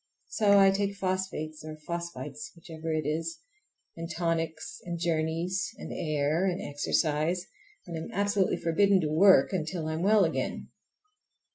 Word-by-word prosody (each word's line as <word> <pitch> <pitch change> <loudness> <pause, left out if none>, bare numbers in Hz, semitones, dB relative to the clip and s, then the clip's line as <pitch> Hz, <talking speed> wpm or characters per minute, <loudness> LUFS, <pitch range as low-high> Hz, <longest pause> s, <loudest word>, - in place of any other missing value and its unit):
So 205 -2 +4
I 195 -1 +7
take 200 0 -1
phosphates 185 -5 -3
or 155 0 -7
phosphites—whichever 165 0 -6
it 155 -2 -1
is, 160 +2 -2 0.6
and 165 0 -6
tonics, 165 -2 -2
and 170 -1 -4
journeys, 170 +2 -1
and - - -7
air, 155 +2 0
and 180 0 -1
exercise, 155 +4 0 0.4
and 170 - -6
am 160 - -5
absolutely 200 0 +1
forbidden 195 +4 +3
to 155 -2 -1
"work" 190 +5 +6
until 165 -2 -2
I 155 - -2
am 160 - -3
well 205 +1 +5
again. 160 - -3
165 Hz, 140 wpm, -29 LUFS, 155-190 Hz, 0.6 s, I